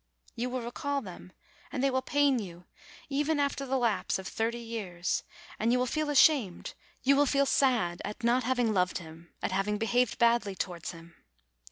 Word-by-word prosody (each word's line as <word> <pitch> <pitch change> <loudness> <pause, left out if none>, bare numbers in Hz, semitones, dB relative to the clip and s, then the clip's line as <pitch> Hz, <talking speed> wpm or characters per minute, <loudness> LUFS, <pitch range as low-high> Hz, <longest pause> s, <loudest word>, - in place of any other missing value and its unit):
You 240 +2 -2
will 255 0 -3
recall 280 +4 -2
them, 185 -3 -10 0.4
and 275 -2 -2
they 275 - +3
will 260 0 +1
pain 280 -1 +2
you, 180 -4 -8 0.4
even 295 +2 0
after 280 -1 -1
the 265 +1 +1
lapse 235 -4 0
of 190 0 -7
thirty 230 +1 -1
years; 210 -7 -3 0.4
and 225 +2 +2
you 250 - +3
will 250 - +1
feel 305 +4 -1
ashamed, 275 - +3 0.3
you 275 +2 +5
will 285 +1 +4
feel 280 +1 +3
sad 240 -12 +2
at 210 +4 -6
not 245 +2 +3
having 245 -2 +1
loved 180 -2 +1
him, 165 0 -12
at - - -1
having 195 +2 0
be 225 - -1
haved 245 0 +1
badly 235 -4 +2
towards 175 -3 -4
him. 170 0 -13
235 Hz, 190 wpm, -30 LUFS, 190-270 Hz, 0.4 s, you